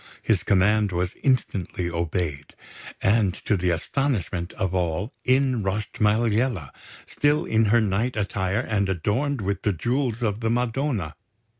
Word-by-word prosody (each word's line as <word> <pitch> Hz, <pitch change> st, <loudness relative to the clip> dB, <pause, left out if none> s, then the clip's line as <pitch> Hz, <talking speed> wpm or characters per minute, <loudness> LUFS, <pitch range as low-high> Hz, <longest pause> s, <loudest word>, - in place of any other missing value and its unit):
His 105 Hz, -6 st, +2 dB
command 105 Hz, +3 st, +3 dB
was 90 Hz, 0 st, -1 dB
instantly 100 Hz, -9 st, 0 dB
obeyed; 85 Hz, -3 st, -3 dB, 0.5 s
and, 100 Hz, -2 st, +3 dB
to 105 Hz, -, +2 dB
the 90 Hz, -1 st, 0 dB
astonishment 90 Hz, -, -1 dB
of 95 Hz, -1 st, -2 dB
all, 90 Hz, -, -1 dB
in 130 Hz, -2 st, +2 dB
rushed 100 Hz, +1 st, -3 dB
Maliella, 110 Hz, -, +1 dB, 0.3 s
still 150 Hz, +2 st, +1 dB
in 110 Hz, 0 st, +2 dB
her 115 Hz, +3 st, +4 dB
night 110 Hz, +4 st, 0 dB
attire 100 Hz, 0 st, -1 dB
and 100 Hz, -5 st, 0 dB
adorned 110 Hz, -, 0 dB
with 100 Hz, 0 st, -2 dB
the 105 Hz, -, +1 dB
Jewels 120 Hz, -, -1 dB
of 105 Hz, -2 st, 0 dB
the 115 Hz, -1 st, -1 dB
Madonna. 120 Hz, -, -1 dB
105 Hz, 140 wpm, -24 LUFS, 90-120 Hz, 0.5 s, her